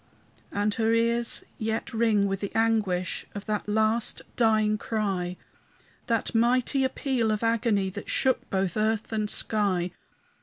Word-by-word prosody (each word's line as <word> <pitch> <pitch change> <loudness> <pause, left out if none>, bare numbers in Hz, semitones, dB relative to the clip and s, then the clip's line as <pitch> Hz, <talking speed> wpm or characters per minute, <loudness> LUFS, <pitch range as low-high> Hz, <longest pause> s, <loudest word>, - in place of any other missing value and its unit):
And 205 +1 0
her 225 0 +1
ears 235 +1 +1 0.2
yet 220 +1 -2
ring 220 -3 +3
with 195 -1 -1
the 200 - -4
anguish 210 -6 0
Of 205 - -6
that 210 0 -2
last 220 +2 +1
dying 215 -2 +3
cry, 190 -6 -2 0.7
That 230 -2 0
mighty 250 +4 +2
appeal 260 -3 0
of 215 +1 -1
agony 225 -4 +1
That 200 +2 -8
shook 260 -2 +1
both 190 0 -1
earth 215 0 0
and 215 -1 -1
sky. 190 -6 +1
215 Hz, 140 wpm, -27 LUFS, 200-230 Hz, 0.7 s, ring